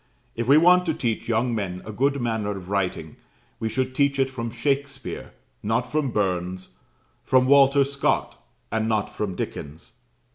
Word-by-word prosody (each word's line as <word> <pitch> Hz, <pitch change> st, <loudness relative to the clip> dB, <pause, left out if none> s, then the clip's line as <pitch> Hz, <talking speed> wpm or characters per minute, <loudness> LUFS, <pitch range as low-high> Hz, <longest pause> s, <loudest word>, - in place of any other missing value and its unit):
If 115 Hz, 0 st, -3 dB
we 140 Hz, +3 st, +7 dB
want 180 Hz, +2 st, +5 dB
to 160 Hz, -, +1 dB
teach 115 Hz, -3 st, -2 dB
young 120 Hz, +2 st, +1 dB
men 95 Hz, -4 st, -3 dB
a 110 Hz, -, -6 dB
good 140 Hz, +6 st, +1 dB
manner 110 Hz, -4 st, -1 dB
of 90 Hz, -1 st, -10 dB
writing, 100 Hz, -2 st, -2 dB, 0.4 s
we 110 Hz, -, -1 dB
should 130 Hz, +2 st, -1 dB
teach 140 Hz, +1 st, +2 dB
it 135 Hz, -1 st, +1 dB
from 115 Hz, -3 st, -4 dB
Shakspeare, 135 Hz, +3 st, -3 dB, 0.3 s
not 115 Hz, +4 st, -1 dB
from 150 Hz, -3 st, 0 dB
Burns; 95 Hz, -3 st, -2 dB, 0.5 s
from 130 Hz, -1 st, +3 dB
Walter 140 Hz, +1 st, +6 dB
Scott, 140 Hz, 0 st, -1 dB, 0.3 s
and 110 Hz, 0 st, 0 dB
not 110 Hz, -2 st, -1 dB
from 100 Hz, -4 st, -3 dB
Dickens. 75 Hz, 0 st, -6 dB
120 Hz, 160 wpm, -24 LUFS, 105-140 Hz, 0.5 s, we